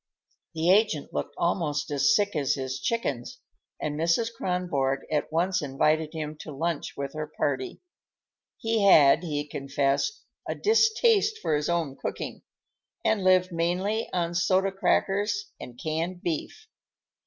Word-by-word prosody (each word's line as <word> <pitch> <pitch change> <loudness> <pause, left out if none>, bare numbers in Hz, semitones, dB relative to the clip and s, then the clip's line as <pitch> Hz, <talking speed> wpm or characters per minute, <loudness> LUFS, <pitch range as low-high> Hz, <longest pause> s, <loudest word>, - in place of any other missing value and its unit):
The 165 +3 +3
agent 195 -7 +2
looked - - -3
almost 150 -4 -1
as 145 0 +3
sick 205 -2 +1
as 140 -4 +1
his 130 -1 -4
chickens, 140 - -2 0.4
and 150 -1 -3
Mrs. 170 +8 +1
Kronborg 145 -9 -1
at 150 0 -1
once 180 +4 +1
invited 155 +2 +1
him 155 -1 -4
to 155 - -8
lunch 160 +2 -3
with 140 -1 -4
her 155 -1 -4
party. 130 -3 -2 0.8
He 225 -1 0
had, 155 -6 +7
he 150 -4 -3
confessed, 140 - -1 0.3
a - - -1
distaste 440 0 +3
for 155 - 0
his 150 +2 -1
own 165 -6 -1
cooking, - - -5 0.6
and 210 -3 +2
lived 185 0 +4
mainly 180 +6 -1
on 170 -1 -1
soda 185 +3 +2
crackers 205 +1 0
and 120 -1 -10
canned 165 +3 -3
beef. 175 - -4
165 Hz, 140 wpm, -27 LUFS, 145-195 Hz, 0.8 s, had